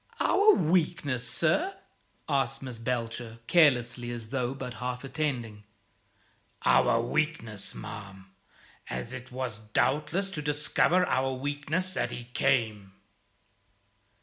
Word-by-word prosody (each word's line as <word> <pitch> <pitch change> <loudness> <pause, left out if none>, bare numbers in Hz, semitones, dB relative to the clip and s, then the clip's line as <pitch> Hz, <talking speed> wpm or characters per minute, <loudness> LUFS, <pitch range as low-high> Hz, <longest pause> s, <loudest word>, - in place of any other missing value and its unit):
"Our 420 +1 +5
weakness, 155 -7 +1
sir?" 310 - +2 0.5
asked 135 -1 0
Miss 125 -3 -6
Belcher, 115 -1 -3
carelessly, 125 -7 +3
as 115 -2 -5
though 130 0 -1
but 125 -2 -6
half 125 0 -3
attending. 125 -7 -3 1.0
"Our 115 - +4
weakness, 120 -5 -2
ma'am; 100 -3 -9 0.6
as 120 - -4
it 130 0 -8
was 125 -4 -4
doubtless 150 - 0
to 150 - -3
discover 150 +5 +2
our 130 +1 +1
weakness 145 +7 -2
that - - 0
he 120 - -6
came." 105 -7 +1
130 Hz, 110 wpm, -29 LUFS, 115-150 Hz, 1.0 s, Our